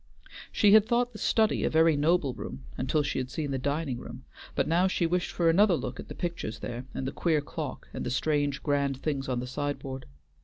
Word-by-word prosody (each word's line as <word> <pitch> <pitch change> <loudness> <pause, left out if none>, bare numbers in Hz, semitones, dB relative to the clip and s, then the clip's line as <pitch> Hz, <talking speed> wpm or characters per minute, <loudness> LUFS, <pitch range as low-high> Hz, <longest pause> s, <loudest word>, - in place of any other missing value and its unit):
She 205 - +4
had 215 0 +7
thought 240 +1 +1
the 215 - -9
study 220 -1 +2
a - - +2
very 160 0 +4
noble 150 -2 +2
room 65 - -7
until 135 +4 0
she 145 - -1
had 130 -1 -3
seen 145 0 -3
the 135 - -1
dining 140 -1 -1
room, - - -9 0.3
but - - +1
now 175 +4 +3
she 185 -2 0
wished 175 +1 0
for 170 - 0
another 185 +3 +5
look - - -5
at - - -7
the - - -8
pictures 170 - -4
there 120 +1 -6
and 135 - -3
the 135 - -2
queer 160 -3 +1
clock, 145 -1 -6
and - - -4
the - - -2
strange, 145 +1 0
grand 140 -2 +1
things 140 -3 -2
on 125 -1 0
the - - -4
sideboard. 135 0 -4
150 Hz, 225 wpm, -28 LUFS, 135-170 Hz, 0.3 s, had